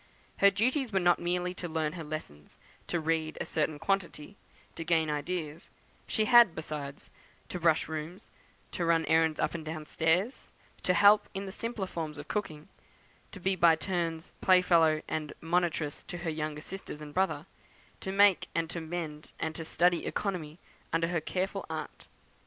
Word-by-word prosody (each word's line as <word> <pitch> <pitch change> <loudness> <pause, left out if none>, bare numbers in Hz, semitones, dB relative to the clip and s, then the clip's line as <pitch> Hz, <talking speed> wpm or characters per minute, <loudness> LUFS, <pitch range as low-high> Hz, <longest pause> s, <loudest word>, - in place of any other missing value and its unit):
Her 200 - +7
duties 255 +5 0
were 195 - +2
not 175 -1 +4
merely 180 +1 -1
to 180 -1 -5
learn 155 -1 -1
her 170 -2 -6
lessons, 150 - -8 0.3
to 175 - 0
read 160 0 -1
a - - -2
certain 155 -1 -1
quantity, 175 0 -2 0.4
to 165 - -6
gain 160 -2 +2
certain 150 - +1
ideas; 160 +1 -4 0.4
she 215 - +1
had, 240 -6 +7
besides, 150 -3 -6 0.4
to 180 - -4
brush 165 -2 +3
rooms, 160 +4 -6 0.4
to 175 - -2
run 165 -1 +3
errands 160 -1 +3
up - - 0
and 170 -2 -5
down 155 0 -5
stairs, 175 - 0 0.3
to 180 - +2
help 205 +3 +6
in 195 +1 -3
the 190 - -6
simpler 230 -1 -3
forms 160 -4 -5
of 145 +1 -8
cooking, 155 -8 -4 0.6
to 200 - -9
be 190 +1 +1
by 170 -2 +6
turns 165 -1 -3
play 185 -1 +5
fellow 160 -3 +4
and 155 -1 -3
monitress 165 -3 0
to 175 - -5
her 170 -2 -3
younger 155 -1 -3
sisters 190 -3 -7
and 150 -1 -9
brother, 190 +3 0 0.5
to 190 - -4
make 200 -1 +5
and 165 -1 0
to 170 - -3
mend, 160 -2 -6
and 160 - -2
to 165 - -6
study 175 +2 +2
economy 170 -6 -3 0.3
under 165 0 +1
her 170 -2 0
careful 185 +4 -2
aunt. - - -6
165 Hz, 175 wpm, -30 LUFS, 155-185 Hz, 0.6 s, Her